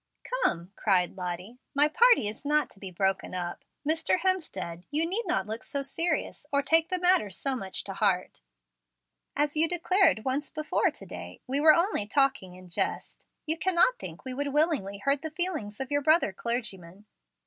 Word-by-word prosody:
"Come," 190 - -1
cried 185 -3 +1
Lottie, 180 +6 -6 0.2
"my 290 +1 +5
party 465 - +4
is 215 +6 -7
not 300 +1 +1
to 195 - -13
be 195 - -7
broken 190 +1 -1
up. 175 -1 -5 0.2
Mr. 320 +3 +2
Hemstead, 195 - -2
you 305 +3 +1
need 405 +4 -1
not 195 - 0
look 220 +3 -6
so 280 -1 -3
serious 310 +1 -1
or 280 0 +2
take 325 +2 +5
the 370 - 0
matter 360 - +3
so 265 +8 -1
much 195 -6 -5
to 195 - -6
heart. 190 - 0 0.9
As 295 +1 0
you 315 +2 +3
declared 355 - +2
once 270 +3 -1
before 310 0 0
to - - -9
day, - - -9
we 275 +2 +1
were 310 0 +7
only 335 - +1
'talking 260 -7 +1
in 185 0 -13
jest.' 170 - -3 0.2
You 320 +1 0
cannot 375 +9 +3
think 170 +5 -9
we 260 - -2
would 285 +2 -2
willingly 290 - +1
hurt 275 +7 0
the 315 - -4
feelings 315 - -2
of 265 +1 -5
your 285 0 +1
brother 310 - +3
clergyman. 200 -5 -4
275 Hz, 180 wpm, -28 LUFS, 195-320 Hz, 0.9 s, were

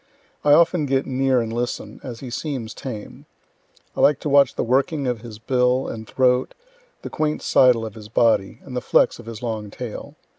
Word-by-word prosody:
I 145 - +5
often 165 -1 +4
get 135 0 +1
near 130 -1 +1
and 115 -1 -4
listen, 120 +1 -4
as 120 -3 -8
he 130 -3 -7
seems 125 -5 -4
tame; 110 -6 -8 0.7
I - - -6
like 145 - +4
to 150 - -2
watch 140 -2 +4
the - - -1
working 140 +4 +1
of 120 -4 -2
his 115 -3 -9
bill 125 +2 +1
and 110 -1 -7
throat, 125 -1 +1 0.5
the - - -7
quaint 155 0 -1
sidle 125 -3 +4
of 110 - -7
his 105 -1 -11
body, 110 -4 +1
and 125 -2 -5
flex - - +2
of 120 - -12
his 115 0 -8
long 110 -3 -3
tail. 120 0 -8
125 Hz, 190 wpm, -22 LUFS, 115-135 Hz, 0.7 s, I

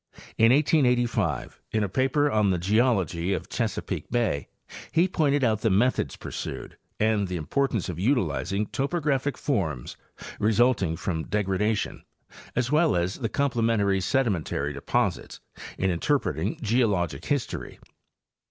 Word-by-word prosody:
In 115 +1 +5
1885, 125 - +1
in 110 -1 +1
a - - 0
paper 135 +7 +1
on 105 -2 +3
the 90 - +2
geology 95 - +1
of 95 - -4
Chesapeake - - -3
bay, 115 - 0 0.4
he 170 +3 +3
pointed 145 -6 +1
out 110 -3 +2
the 110 - +2
methods 115 +7 +1
pursued - - -6 0.2
and 110 -2 +2
the 90 - -4
importance 115 - -1
of 85 -2 -5
utilizing 105 -3 0
topo 140 +8 -2
graphic 140 -2 0
forms 80 - -2 0.4
resulting 110 -5 +2
from 80 -1 -3
degradation, 105 +1 -1 0.5
as 125 +1 0
well 155 - +3
as 90 +2 -1
the 115 -4 -2
comple 130 -1 0
mentary 100 -4 +2
sedimentary 90 - 0
deposits - - -1 0.4
in 95 0 +1
interpreting 90 - 0
geologic 105 - +1
history. 145 -4 -3
110 Hz, 130 wpm, -26 LUFS, 95-130 Hz, 0.5 s, In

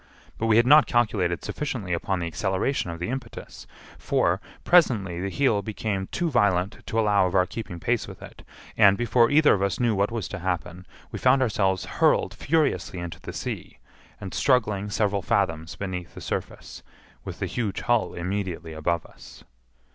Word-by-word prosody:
But 115 - 0
we 110 -1 +4
had 120 - +5
not 150 +3 +7
calculated 105 -8 0
sufficiently 120 - -3
upon 90 +2 -1
the 85 - -2
acceleration 95 - -1
of 85 - -5
the 90 +1 -4
impetus; 130 -2 -7 0.3
for, - - +1 0.2
presently 105 - +3
the 100 - -2
heel 115 -3 +1
became 100 -2 -3
too 170 -2 -2
violent 100 -6 +1
to 115 - -1
allow 105 -3 +3
of 90 - -4
our 90 -1 +4
keeping 90 -2 -7
pace - - -1
with - - -10
it; - - -12 0.3
and, 100 -2 +6
before 120 0 +3
either 150 +1 +5
of 100 - 0
us 100 -1 0
knew 120 -2 +2
what 100 0 +1
was 115 -4 -4
to - - -6
happen, 90 0 -4 0.2
we - - -5
found 130 +1 +4
ourselves 95 -5 0
hurled - - +2
furiously 155 - 0
into 85 -2 -6
the - - -7
sea, - - -6 0.4
and 95 -2 -7
struggling 105 -6 +1
several 105 -2 0
fathoms 80 -2 -1
beneath 90 -3 -6
the - - -8
surface, - - -5 0.4
with - - -7
the - - -2
huge 110 -5 -3
hull 120 -2 +1
immediately 90 -2 -4
above 80 +2 -1
us. - - -15
100 Hz, 175 wpm, -25 LUFS, 90-120 Hz, 0.4 s, not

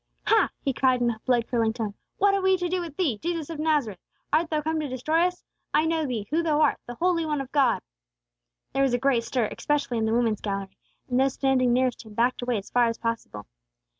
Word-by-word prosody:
"Ha!" 445 - +4
he 275 - -1
cried, 255 0 +2
in 240 -1 +2
a 220 - -7
blood 240 -2 +3
curdling 230 -3 +1
tone. 220 -3 -3 0.2
"What 400 0 +4
have 395 - +1
we 380 0 +3
to 355 -1 -2
do 365 +1 -1
with 330 -4 -8
Thee, 280 - 0
Jesus 335 -2 -3
of 320 - -6
Nazareth? 295 - 0 0.3
Art 320 +2 +3
thou 310 - 0
come 315 +1 -1
to 305 - -2
destroy 310 +7 +1
us? 360 0 -8 0.3
I 310 - +4
know 320 -2 0
Thee, 230 -5 -3
who 325 +2 +2
thou 310 -3 +1
art, 305 -2 +3
the 240 - -6
holy 345 +2 +1
One 300 -2 -1
of 270 -1 -6
God!" 275 -5 +2 0.9
There 270 - +1
was 265 -3 +3
a - - +2
great 245 -2 +2
stir, 240 -2 0
especially 285 -5 -1
in 220 - +1
the 220 - 0
woman's 230 -3 +1
gallery; 195 -2 -4 0.3
and 250 0 +1
those 270 0 +2
standing 260 -2 +2
nearest 255 0 +1
him 215 -2 -13
backed 245 +3 +1
away 245 -1 0
as 200 - -8
far 245 -1 +4
as 230 - -2
possible. 230 - -4
265 Hz, 240 wpm, -26 LUFS, 235-315 Hz, 0.9 s, Ha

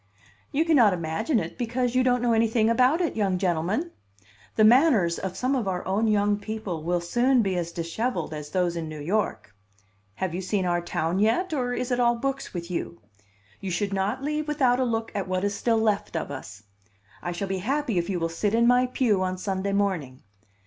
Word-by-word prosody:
"You 310 +4 +1
cannot 250 - +5
imagine 180 - -1
it - - -6
because 245 +1 -1
you 255 - +3
don't 250 -1 +2
know 240 -1 +3
anything 225 0 +2
about 255 +8 +3
it, 340 - -1
young 195 -4 +1
gentleman! 185 - -1 0.6
The 215 - +4
manners 225 - +5
of 190 -1 -5
some 260 +2 0
of 240 -6 -1
our 180 -2 -2
own 200 +4 +1
young 205 -1 +2
people 210 -6 -5
will 175 +2 0
soon 240 +7 +2
be 190 -2 -1
as 170 -1 -2
dishevelled 170 +6 -3
as 150 -1 -6
those 175 0 0
in 165 -2 -4
New 155 -1 -7
York. 175 - -2 0.6
Have 180 - -3
you 180 - -3
seen 190 0 -1
our 175 -1 +1
town 175 +1 -1
yet, 235 - +1
or 250 -4 -1
is 250 0 -3
it 245 - +1
all 240 -1 +3
books 270 +3 -3
with 175 0 -6
you? 170 - -4 0.6
You 195 - -5
should 195 +3 -1
not 200 +7 -1
leave 300 +1 -2
without 265 -5 +2
a 260 - +2
look 225 -1 -2
at 200 -2 -3
what 185 0 -1
is 205 0 0
still 225 +2 +1
left 215 -5 0
of 160 - -4
us. 105 -7 -8 0.6
I 175 - -3
shall 175 +3 -3
be 190 0 -2
happy 255 -1 0
if 170 - -3
you 185 -3 -1
will 165 - 0
sit 200 +6 -1
in 235 +1 +4
my 250 +1 +4
pew 235 -6 +1
on 185 0 -1
Sunday 190 +1 -2
morning. 185 -11 -1
205 Hz, 210 wpm, -26 LUFS, 180-245 Hz, 0.6 s, cannot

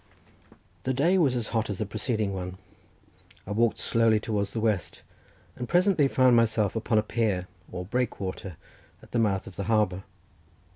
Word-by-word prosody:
The 130 0 -1
day 170 +8 +3
was 140 -7 +3
as 120 -3 -3
hot 110 -2 -1
as 100 - -3
the 110 - -2
preceding 110 0 -2
one. 90 -1 -5 0.9
I 105 - -7
walked 115 +2 +2
slowly 115 -2 +2
towards 105 -2 -2
the 115 - -3
west, 110 -4 -1 0.5
and 125 - -6
presently 175 -4 +4
found 130 -2 +4
myself 110 -3 +2
upon 115 0 +1
a 105 - +4
pier, 105 -5 -1 0.2
or 90 - -5
breakwater, 100 -5 -3 0.5
at - - -17
the 120 - +1
mouth 100 -4 +1
of 90 - -11
the 100 - -3
harbour. 105 -4 +1
110 Hz, 165 wpm, -27 LUFS, 100-120 Hz, 0.9 s, presently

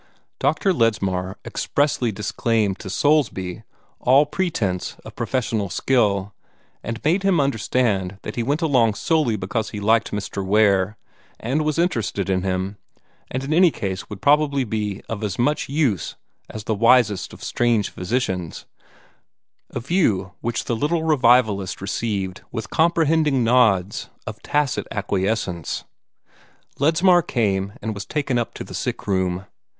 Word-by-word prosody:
Dr. 195 -3 +2
Ledsmar 95 - 0
expressly 140 -5 0
disclaimed 105 0 -1
to 100 - -7
Soulsby 100 - +1 0.4
all 135 +4 +5
pretence 145 - -2
of - - -10
professional 115 -6 -1
skill, 100 -3 +1 0.5
and 115 0 -5
made 170 +6 +2
him 195 -4 +2
understand 110 -7 0
that 105 - -6
he 120 - -1
went 145 +7 0
along 120 -8 +3
solely 155 -7 +1
because 105 +3 -2
he 105 - -6
liked 110 +2 +2
Mr. 100 -1 -3
Ware, 100 0 +3 0.4
and 130 +7 -1
was 155 0 -1
interested 115 - 0
in 95 -1 +1
him, 95 +1 -2 0.5
and 130 +1 -3
in 140 +3 -1
any 175 +2 +6
case 95 - -5
would 100 -2 -9
probably 145 -1 +3
be 105 -2 -3
of 115 -1 -4
as 100 -3 -2
much 145 +4 0
use 135 - 0 0.3
as 110 - -7
the 110 - -1
wisest 115 -2 +3
of - - -12
strange 120 -4 +1
physicians 90 -4 -3 1.0
a - - -4
view 115 - +1
which 120 0 -2
the 120 - -1
little 160 +7 0
revivalist 120 - +3
received 100 -2 -3
with 110 -3 -5
comprehending 160 -4 +2
nods 110 -6 +2 0.2
of - - -7
tacit 145 -2 0
acquiescence. 100 -5 -2 1.0
Ledsmar 175 +5 +4
came, 100 - -1
and 110 - -2
was 100 -2 -7
taken 140 -5 0
up 120 - -4
to - - -5
the - - -11
sick - - -3
room. 95 -1 0
115 Hz, 140 wpm, -22 LUFS, 100-140 Hz, 1.0 s, any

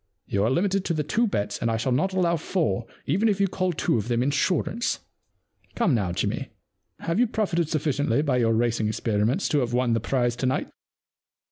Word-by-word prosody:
You 100 0 0
are - - +2
limited 190 +7 +1
to 170 - 0
the 150 - 0
two 230 +10 +1
bets, 105 - -2
and 115 - 0
I 115 - 0
shall 125 +3 -1
not 155 +10 +1
allow 180 -2 +2
four 160 -7 -1 0.2
even 200 +10 +2
if 200 -2 0
you 200 - +3
call 185 0 -1
two 150 -7 0
of 105 - -4
them 120 0 +1
insurance. 180 - 0 0.7
Come 215 - +2
now, 100 -7 0
Jimmy, 85 - -2 0.5
have 165 +5 -1
you 245 - +4
profited 180 -7 0
suffi 155 -2 0
ciently 140 +4 +1
by 130 -4 +2
your 115 -2 +2
racing 115 -1 +1
experiences 110 - 0
to 150 - +2
have 120 -2 -1
won 125 -1 +2
the 115 - +2
prize 120 +1 0
to 130 - 0
night 130 - -1
140 Hz, 210 wpm, -25 LUFS, 115-185 Hz, 0.7 s, you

